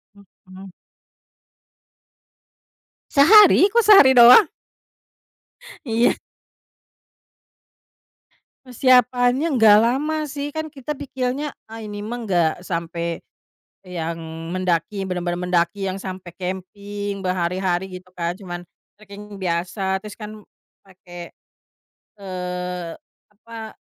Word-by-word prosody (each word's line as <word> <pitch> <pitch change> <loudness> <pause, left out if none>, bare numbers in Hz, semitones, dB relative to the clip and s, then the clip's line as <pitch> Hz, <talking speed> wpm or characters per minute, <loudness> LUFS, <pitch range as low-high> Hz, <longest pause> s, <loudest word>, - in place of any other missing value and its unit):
Mhm. 190 -1 -16 2.4
Sehari? 385 +6 +7
Kok 470 0 +3
sehari 390 -11 +7
doang? 245 - +8 1.4
Iya. 230 0 +2 2.5
Persiapannya 250 +2 +2
gak 210 -2 +7
lama 300 +6 -1
sih, 285 0 -5
kan 315 -1 -4
kita 290 +1 -6
pikirnya 265 +1 -4 0.2
ah 225 0 -9
ini 210 -1 -7
mah 230 +4 -5
gak 175 -4 0
sampai, 170 -1 -4 0.7
yang 170 -2 -5 0.4
mendaki 185 +1 -1
bener-bener 175 -1 -3
mendaki 180 +2 0
yang 190 - -6
sampe 185 -2 -8
camping 200 +2 -6
berhari-hari, 185 0 -2
gitu 185 0 -23
kan 170 0 -3
cuman 175 -3 -7 0.4
treking 205 0 -12
biasa 185 +2 -2
terus 210 -1 -9
kan 215 0 -9 0.5
pake, 175 -2 -12 0.9
eee, 180 -2 -5 0.4
apa, 220 +1 -10
200 Hz, 90 wpm, -21 LUFS, 180-245 Hz, 2.5 s, doang